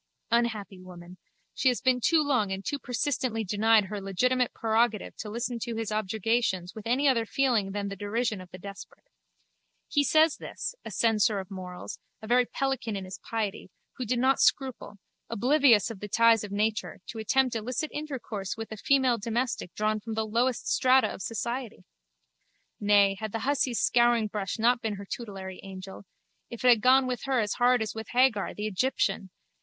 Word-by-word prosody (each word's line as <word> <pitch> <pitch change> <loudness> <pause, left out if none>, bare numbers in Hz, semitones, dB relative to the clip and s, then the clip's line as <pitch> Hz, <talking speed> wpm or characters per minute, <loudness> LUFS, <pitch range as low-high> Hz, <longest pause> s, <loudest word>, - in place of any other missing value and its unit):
Unhappy 220 -5 0
woman, 180 -1 -12 0.3
she - - 0
has 250 -2 +3
been 255 -1 +2
too 320 +4 +3
long 250 -9 +1
and 190 +1 -4
too 285 - -2
persistently 245 -2 -1
denied 215 +2 +3
her 205 +1 -5
legitimate 250 +6 +1
prerogative 225 -1 0
to 215 - -7
listen 235 +2 -3
to 235 0 -4
his 225 -1 -3
objurgations 215 -2 -1
with 220 0 -8
any 265 +5 +2
other 245 -4 +3
feeling 230 -4 +1
than 200 0 -3
the 195 - -5
derision 210 +1 -2
of 180 - -12
the 185 - -10
desperate. 195 +2 -11 0.8
He 290 - +2
says 315 +1 +4
this, - - -5
a - - -7
censor 220 -2 +2
of 190 -1 -6
morals, 180 -2 -7 0.2
a 220 - -10
very 245 +2 +3
pelican 265 -5 -2
in 195 -1 -5
his 185 +1 -8
piety, 215 -5 -4 0.3
who 255 - -3
did 245 +1 -1
not 260 +2 +3
scruple, 260 -6 0 0.3
oblivious 245 -3 +4
of 210 - -9
the 210 - -6
ties 230 +1 +4
of 205 - -7
nature, 210 0 -1
to 225 - -6
attempt 255 +3 +1
illicit 250 +7 -3
intercourse 245 -11 -5
with 225 0 -7
a 220 - -6
female 260 0 +2
domestic 230 -3 -2
drawn 215 0 0
from 220 +1 -6
the 220 0 -1
lowest 235 +3 0
strata 260 +1 +3
of - - -9
society! 235 0 -4 1.0
Nay, 200 -1 +4
had 220 -1 -4
the 225 - -2
hussy's 265 -4 +1
scouringbrush 220 -5 +2
not 235 +2 +3
been 220 -2 -2
her 200 0 -8
tutelary 195 -4 -7
angel, 190 0 -9 0.4
it 235 - -8
had 240 -3 +6
gone 260 +2 +5
with 250 0 -3
her 265 -2 +1
as 210 -2 0
hard 245 -1 +4
as 215 - -5
with 220 0 -7
Hagar, 245 -5 +2
the 210 - -4
Egyptian! 210 -2 0
225 Hz, 180 wpm, -28 LUFS, 205-250 Hz, 1.0 s, had